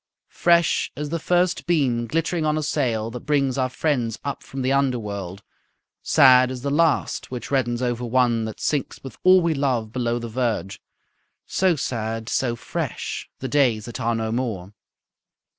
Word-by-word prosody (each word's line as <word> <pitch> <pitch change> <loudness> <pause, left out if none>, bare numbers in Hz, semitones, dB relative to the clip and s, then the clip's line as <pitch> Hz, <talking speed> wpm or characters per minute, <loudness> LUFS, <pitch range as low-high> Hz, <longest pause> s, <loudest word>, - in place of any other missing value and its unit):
Fresh 170 -1 +2
as 150 0 -4
the 165 +2 -2
first 180 +3 +1
beam 130 -9 +1
glittering 165 +3 -1
on 155 0 +1
a 155 - -1
sail, 115 -7 -1
That 125 - -6
brings 135 -2 0
our 130 -1 0
friends 125 -6 -1
up 140 -1 -4
from 135 -1 -6
the 130 - +1
underworld, 105 -8 -2 0.6
Sad 130 -1 +6
as 130 -1 -6
the 140 - -1
last 160 -1 +1
which 125 +1 -6
reddens 120 -3 0
over 120 -1 -1
one 120 -2 +2
That 110 - -7
sinks 145 -4 -2
with 135 -4 -10
all 185 0 +7
we 170 -1 +2
love 130 -6 -1
below 120 -1 -1
the 120 -1 -5
verge; 110 -5 -2 0.6
So 185 -2 +2
sad, 115 -4 -3
so 120 -3 0
fresh, - - -5
the 130 - -5
days 120 -6 +2
that 120 - -7
are 115 -1 0
no 110 -1 -2
more. 110 -6 -3
125 Hz, 170 wpm, -23 LUFS, 115-145 Hz, 0.6 s, all